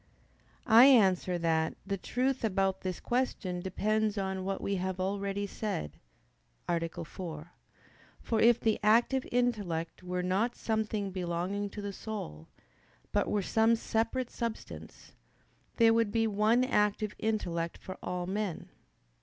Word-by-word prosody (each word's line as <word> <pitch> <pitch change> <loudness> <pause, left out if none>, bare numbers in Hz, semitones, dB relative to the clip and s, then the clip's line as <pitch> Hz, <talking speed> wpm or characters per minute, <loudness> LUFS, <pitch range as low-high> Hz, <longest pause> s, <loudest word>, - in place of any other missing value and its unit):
I 230 +1 +8
answer 190 -8 +5
that, 160 -1 0
The 200 0 -1
truth 255 +7 -1
about 195 -3 +1
this 185 -2 -3
question 240 -8 -1
depends 210 +3 0
on 190 -1 -2
what 195 +1 -2
we 200 0 -1
have 185 0 -3
already 200 +1 -1
said 200 - -4 0.7
(A. 170 -1 +1 0.3
4). 165 -1 -8 0.7
For 225 - -1
if 235 0 +6
the 220 -1 +1
active 235 +5 +3
intellect 205 -11 -1
were 180 0 -3
not 200 +7 0
something 215 -3 -2
belonging 185 +3 -2
to 205 +1 -7
the 200 0 -4
soul, 80 - -6 0.6
but - - +1
were 205 -2 0
some 225 +4 +3
separate 225 +3 -1
substance, 230 -2 -6 0.6
there 230 -1 +6
would 225 -2 +2
be 225 0 +2
one 220 +3 +3
active 210 -3 +1
intellect 175 -7 -2
for 185 - -9
all 180 0 -3
men. 195 -1 -3
200 Hz, 135 wpm, -31 LUFS, 185-225 Hz, 0.7 s, I